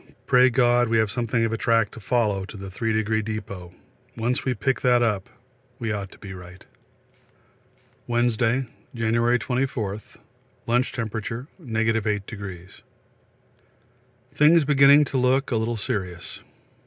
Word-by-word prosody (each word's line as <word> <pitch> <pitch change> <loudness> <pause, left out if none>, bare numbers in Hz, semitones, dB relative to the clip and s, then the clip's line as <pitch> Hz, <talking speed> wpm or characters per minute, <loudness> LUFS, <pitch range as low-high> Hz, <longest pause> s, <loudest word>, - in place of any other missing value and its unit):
Pray 125 0 +5
God 120 -1 +3
we 115 - +2
have 110 -2 +2
something 115 0 0
of 115 - -2
a - - -1
track 115 -2 +2
to - - -11
follow 105 -3 0
to 105 - -10
the 95 -1 -8
Three 115 +4 -2
Degree 110 0 0
Depôt 100 -5 -6 0.5
once 120 +3 -1
we 130 -2 -1
pick 135 0 -1
that 125 -1 +4
up 105 -5 -1 0.5
we 115 -4 -3
ought 100 -2 -4
to - - -16
be 100 -2 -9
right. 90 0 -12 1.4
Wednesday, 120 +1 +1 0.3
January 115 +1 +2
24. 125 -5 -2 0.6
Lunch 125 +2 +1
Temp. 115 -4 -4
8°. 110 - -3 1.5
Things 155 +1 +5
beginning 140 +1 +6
to 140 -1 -2
look 130 +2 +2
a - - +1
little 115 +1 -1
serious. 90 -4 -4
115 Hz, 135 wpm, -24 LUFS, 105-125 Hz, 1.5 s, beginning